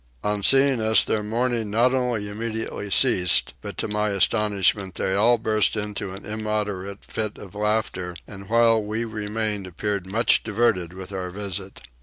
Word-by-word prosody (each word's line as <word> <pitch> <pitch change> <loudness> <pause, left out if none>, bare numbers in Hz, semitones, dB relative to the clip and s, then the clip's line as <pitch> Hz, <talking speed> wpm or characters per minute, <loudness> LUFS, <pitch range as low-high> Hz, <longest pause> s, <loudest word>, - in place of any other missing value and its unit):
On 105 0 0
seeing 135 +1 +4
us 110 -1 +5
their 110 - 0
mourning 115 +1 -1
not 120 +5 +3
only 125 -5 0
immediately 110 -1 -4
ceased, 90 - +3
but - - -7
to - - -1
my 105 0 0
astonishment 100 -1 +1
they 95 - -1
all 115 +5 +4
burst 110 -2 +1
into 105 -1 -4
an 100 - -11
immoderate 105 -2 -3
fit 110 -1 -3
of 95 -2 -11
laughter, 105 -4 -1
and 100 -1 -10
while 115 -1 +4
we 110 +2 -3
remained 105 -2 -3
appeared 100 +1 -3
much 110 +5 +3
diverted 100 -6 0
with 95 +1 -8
our 95 -2 -4
visit. 100 0 -5
105 Hz, 160 wpm, -24 LUFS, 100-110 Hz, -, us